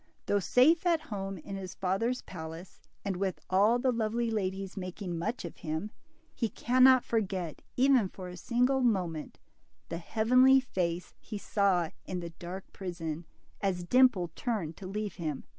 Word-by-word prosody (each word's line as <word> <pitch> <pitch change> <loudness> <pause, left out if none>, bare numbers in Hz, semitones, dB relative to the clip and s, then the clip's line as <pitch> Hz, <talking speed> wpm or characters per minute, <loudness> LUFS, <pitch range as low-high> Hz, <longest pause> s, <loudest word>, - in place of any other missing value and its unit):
Though 205 - +2
safe 305 - +4
at 335 -2 +4
home 195 -1 -4
in 195 +4 -7
his 185 -2 -7
father's 210 +7 0
palace, 165 +1 -9 0.2
and 195 -2 -1
with 190 -1 -1
all 205 +5 +5
the 255 +1 +2
lovely 230 0 0
ladies 195 -2 -2
making 185 -1 -5
much 220 +4 -2
of 170 - -8
him, 160 +6 -4 0.4
he 230 - -1
cannot 255 +4 +5
forget, 190 -7 -2 0.2
even 255 -6 +4
for 185 -1 -8
a 180 - -8
single 250 +8 +1
moment, 180 -10 0 0.5
the 170 - -3
heavenly 255 +8 +5
face 180 -8 -2
he 215 - -6
saw 195 -5 +1
in 185 - -4
the 170 -1 -6
dark 180 +3 -7
prison, 170 -3 -5 0.4
as 185 -3 0
Dimple 210 -4 +4
turned 195 -10 -2
to 190 - -7
leave 210 +1 -4
him. 155 -6 -3
195 Hz, 160 wpm, -30 LUFS, 175-235 Hz, 0.5 s, all